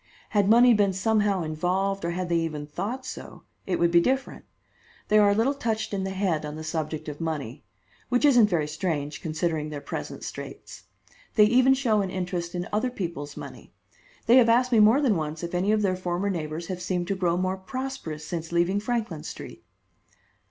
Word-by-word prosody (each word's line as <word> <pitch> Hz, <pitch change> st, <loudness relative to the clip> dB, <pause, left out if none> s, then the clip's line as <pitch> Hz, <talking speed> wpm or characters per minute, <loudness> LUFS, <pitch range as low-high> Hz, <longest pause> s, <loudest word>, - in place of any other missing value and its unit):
Had 205 Hz, -2 st, +2 dB
money 240 Hz, +2 st, +7 dB
been 205 Hz, -3 st, +2 dB
somehow 205 Hz, -1 st, +1 dB
involved, 180 Hz, +5 st, -1 dB
or 170 Hz, -, -1 dB
had 180 Hz, +1 st, -2 dB
they 170 Hz, -1 st, +2 dB
even 155 Hz, -3 st, -3 dB
thought 215 Hz, -, -4 dB
so, -, -, -9 dB, 0.2 s
it 185 Hz, -, 0 dB
would 170 Hz, 0 st, +2 dB
be 170 Hz, 0 st, +6 dB
different. 265 Hz, +6 st, -1 dB, 0.6 s
They 215 Hz, -, +5 dB
are 205 Hz, -1 st, +6 dB
a 200 Hz, -, +3 dB
little 235 Hz, +6 st, +2 dB
touched 225 Hz, -6 st, -2 dB
in 190 Hz, -1 st, -1 dB
the -, -, -2 dB
head 190 Hz, -5 st, -1 dB
on 150 Hz, 0 st, -5 dB
the 155 Hz, -, -7 dB
subject 155 Hz, -1 st, -3 dB
of 150 Hz, +1 st, -6 dB
money; 150 Hz, -5 st, -4 dB, 0.5 s
which 245 Hz, +3 st, +2 dB
isn't 245 Hz, -7 st, +6 dB
very 160 Hz, -5 st, 0 dB
strange 150 Hz, -2 st, -3 dB
considering 155 Hz, -1 st, -2 dB
their 150 Hz, -1 st, -5 dB
present 140 Hz, -, -6 dB
straits. -, -, -8 dB, 0.5 s
They 215 Hz, -, +7 dB
even 255 Hz, +4 st, +5 dB
show 230 Hz, -6 st, +2 dB
an 195 Hz, -, -2 dB
interest 180 Hz, -2 st, -3 dB
in 175 Hz, 0 st, -3 dB
other 215 Hz, +5 st, +1 dB
people's 170 Hz, -, -5 dB
money. -, -, -10 dB, 0.5 s
They 240 Hz, +2 st, +6 dB
have 235 Hz, -3 st, +6 dB
asked 250 Hz, +2 st, +3 dB
me 230 Hz, -, +5 dB
more 220 Hz, +7 st, +6 dB
than 250 Hz, -8 st, +3 dB
once 155 Hz, 0 st, -4 dB
if 170 Hz, -, -5 dB
any 185 Hz, +4 st, +1 dB
of 215 Hz, -1 st, +2 dB
their 185 Hz, -2 st, +1 dB
former 180 Hz, +2 st, -2 dB
neighbors 160 Hz, -1 st, -4 dB
have 180 Hz, 0 st, -5 dB
seemed 180 Hz, -1 st, -2 dB
to 195 Hz, -, +1 dB
grow 175 Hz, -2 st, +1 dB
more 185 Hz, +1 st, -1 dB
prosperous 190 Hz, -, -5 dB
since 165 Hz, 0 st, -5 dB
leaving 175 Hz, +4 st, +2 dB
Franklin 215 Hz, -7 st, -2 dB
Street." -, -, -9 dB
185 Hz, 200 wpm, -26 LUFS, 165-215 Hz, 0.6 s, money